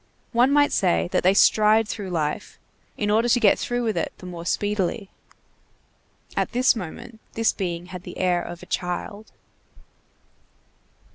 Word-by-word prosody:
One 245 Hz, +2 st, +4 dB
might 290 Hz, 0 st, +4 dB
say 175 Hz, -2 st, +1 dB
that -, -, +2 dB
they 185 Hz, +2 st, +3 dB
stride 215 Hz, +1 st, +5 dB
through 205 Hz, -3 st, -5 dB
life, 160 Hz, +2 st, -3 dB, 0.4 s
in 205 Hz, -1 st, 0 dB
order 225 Hz, +3 st, +2 dB
to 245 Hz, -, +4 dB
get 215 Hz, -4 st, +4 dB
through 245 Hz, 0 st, -2 dB
with 220 Hz, -2 st, -1 dB
it -, -, -2 dB
the -, -, -12 dB
more 175 Hz, -1 st, -7 dB
speedily. 205 Hz, 0 st, -1 dB, 1.2 s
At -, -, -1 dB
this 250 Hz, +1 st, +3 dB
moment, 220 Hz, +3 st, -8 dB
this 225 Hz, 0 st, +2 dB
being 175 Hz, -3 st, -4 dB
had 180 Hz, 0 st, -8 dB
the -, -, -10 dB
air 180 Hz, -1 st, +1 dB
of 175 Hz, 0 st, -8 dB
a -, -, -9 dB
child. 200 Hz, +4 st, -4 dB
205 Hz, 155 wpm, -24 LUFS, 180-225 Hz, 1.2 s, stride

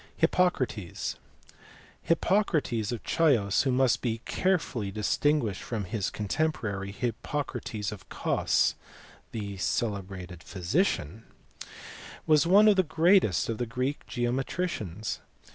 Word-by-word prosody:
Hippocrates. 130 Hz, -, 0 dB, 0.8 s
Hippocrates 165 Hz, -, +1 dB
of 120 Hz, -, -4 dB
Chios 125 Hz, -, +3 dB
(who 135 Hz, -, +1 dB
must 125 Hz, -1 st, +3 dB
be 115 Hz, -2 st, -2 dB
carefully 160 Hz, -, 0 dB
distinguished 110 Hz, +2 st, 0 dB
from 115 Hz, -4 st, -3 dB
his 100 Hz, 0 st, -2 dB
contemporary, 105 Hz, -5 st, -2 dB
Hippocrates 115 Hz, -2 st, -3 dB
of 105 Hz, -3 st, -10 dB
Cos, -, -, +1 dB, 0.6 s
the 100 Hz, -3 st, -5 dB
celebrated 95 Hz, -4 st, -3 dB
physician) 100 Hz, -, -1 dB, 1.0 s
was 155 Hz, +1 st, +4 dB
one 205 Hz, +4 st, +7 dB
of 205 Hz, -2 st, +5 dB
the -, -, +7 dB
greatest 165 Hz, -, +3 dB
of 115 Hz, -2 st, -3 dB
the 120 Hz, -, -1 dB
Greek 130 Hz, +5 st, -3 dB
geometricians. 120 Hz, -, -2 dB
120 Hz, 105 wpm, -28 LUFS, 100-155 Hz, 1.0 s, one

